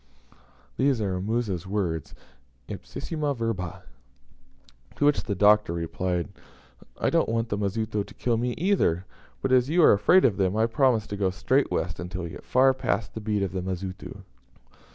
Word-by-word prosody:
These 135 -2 +2
are 95 -3 -1
Musa's 100 -4 -2
words 90 -6 -2 0.5
ipsissima 140 - -4
verba. 105 -7 -3 1.1
To 145 - +1
which 145 0 +3
the 100 - -2
Doctor 105 -2 +4
replied, 85 0 -2 0.7
"I - - +1
don't - - +2
want 115 0 -1
the 105 - -1
Mazitu 105 +1 -1
to - - -14
kill 120 -2 0
me 120 +1 -1
either; 150 - +1 0.4
but, 135 - 0
as 130 +1 +4
you 170 +2 +4
are - - +8
afraid 180 - +5
of 105 - +2
them, 95 +1 +1
I 110 - +4
promise 115 -2 +2
to 100 - -6
go 100 -2 +1
straight 130 +9 +1
west 90 -4 -2
until 90 +1 -5
we 85 - -5
get - - -10
far 130 +1 +4
past 130 -4 -2
the 110 - -6
beat 105 -1 0
of 95 - -2
the 95 -1 -3
Mazitu." 95 +1 -6
105 Hz, 175 wpm, -26 LUFS, 95-125 Hz, 1.1 s, are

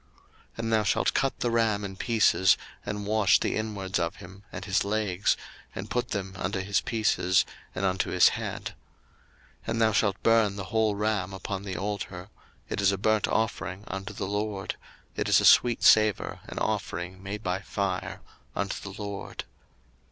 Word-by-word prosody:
02:029:017 - - -24
And 115 -1 -1
thou 110 - +4
shalt 95 - +2
cut 135 - 0
the 120 - +1
ram 110 -3 +2
in 95 -1 -6
pieces, 105 -4 +4 0.3
and 105 0 -4
wash 105 -1 +4
the - - -1
inwards 100 -3 -2
of 85 0 -1
him, 95 +2 -12
and - - -6
his 95 - +1
legs, 100 -2 +1 0.4
and 100 +3 -6
put 125 0 0
them 95 -2 -3
unto 95 +3 -1
his 100 +1 +1
pieces, 105 -5 +2 0.3
and 95 - -1
unto 95 -1 0
his - - +6
head. - - -5 0.9
02:029:018 - - -24
And 115 - 0
thou 110 - +4
shalt 100 -2 +1
burn 115 -3 +4
the 100 - -4
whole 110 0 +1
ram 105 -2 -1
upon 95 0 -4
the 95 -2 -5
altar: 95 -2 -4 0.4
it - - -2
is 100 0 +4
a 100 - -1
burnt 110 +2 +2
offering 100 -3 -1
unto 95 0 -5
the 100 -1 -4
LORD: 105 0 -2 0.4
it - - -1
is - - +6
a - - +1
sweet 120 -2 +6
savour, 110 -2 +4
an - - -8
offering 95 -3 -2
made 100 +2 -6
by 90 -1 -1
fire 100 -2 -3 0.3
unto 100 0 -2
the 100 - -11
LORD. 100 -1 -5
100 Hz, 180 wpm, -27 LUFS, 95-110 Hz, 0.9 s, his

